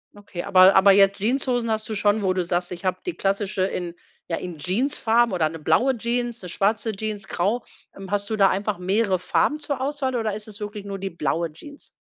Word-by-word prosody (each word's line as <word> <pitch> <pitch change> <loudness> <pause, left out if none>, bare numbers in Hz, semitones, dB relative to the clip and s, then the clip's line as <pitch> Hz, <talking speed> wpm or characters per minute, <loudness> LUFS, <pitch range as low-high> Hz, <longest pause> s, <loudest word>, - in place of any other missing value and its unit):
Okay, 205 -3 -7
aber 185 0 +6
aber 195 +1 +7
jetzt 195 0 +5
Jeanshosen 245 +1 0
hast 220 0 -1
du 220 - -4
schon, 205 +1 +2
wo 185 -1 +2
du 185 -1 0
sagst: 175 +1 -2
„Ich 175 -1 -7
habe 185 -1 0
die 360 - -2
klassische 195 -2 -1
in 180 -2 -3 0.3
ja 165 - -2
in 175 -3 -7
Jeansfarben 230 - +1
oder 160 -4 +1
‘ne 165 +1 -8
blaue 160 - +2
Jeans, 240 +1 -2
‘ne 180 - -8
schwarze 215 +5 0
Jeans, 215 0 -4
grau." 205 +8 -1 0.3
Ähm 195 -1 -9
hast 200 0 -1
du - - +1
da 195 -2 +5
einfach 200 -1 -2
mehrere 190 +1 +1
Farben 295 - +1
zur 285 -3 -4
Auswahl 270 -1 -2
oder 220 -3 -1
ist 210 +1 -7
es 215 0 -11
wirklich 210 -1 -6
nur 200 -1 -5
die 195 0 -5
blaue 165 +1 -2
Jeans? 290 - -13
200 Hz, 220 wpm, -23 LUFS, 185-225 Hz, 0.3 s, aber